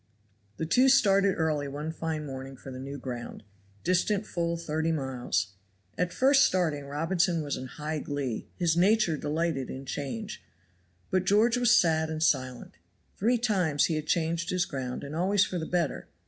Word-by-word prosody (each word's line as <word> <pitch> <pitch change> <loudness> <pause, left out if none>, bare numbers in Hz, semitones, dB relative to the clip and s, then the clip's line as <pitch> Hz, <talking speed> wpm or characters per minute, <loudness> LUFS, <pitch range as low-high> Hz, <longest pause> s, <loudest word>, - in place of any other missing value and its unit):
The 160 - -2
two 255 +11 +4
started 200 -7 +4
early 155 -3 0
one 150 +3 -4
fine 160 -1 -3
morning 135 -1 -7
for 135 - -10
the 130 - -7
new 140 +2 -6
ground, 125 -4 -7 0.4
distant 185 +4 +1
full 170 -3 -2
thirty 160 0 -1
miles. 125 - -2 0.4
At 180 +5 -1
first 270 +4 +5
starting 160 - +1
Robinson 165 +3 0
was 145 -1 -2
in 130 - -6
high 150 +4 -4
glee; 140 -5 -3
his 170 -2 +1
nature 195 -1 +3
delighted 150 -2 -1
in 135 +1 -7
change; 210 - -5 0.7
but 185 0 +1
George 215 +5 +4
was 240 -1 +5
sad 160 -2 +2
and 155 0 -2
silent. 130 - 0 0.4
Three 235 +5 +2
times 185 -11 +2
he 165 - -1
had 155 0 -3
changed 170 0 0
his 180 -1 +1
ground 130 -4 -5
and 140 +2 -6
always 190 +4 +3
for 180 - -3
the 160 - -4
better. 175 -4 -1
160 Hz, 170 wpm, -28 LUFS, 140-185 Hz, 0.7 s, first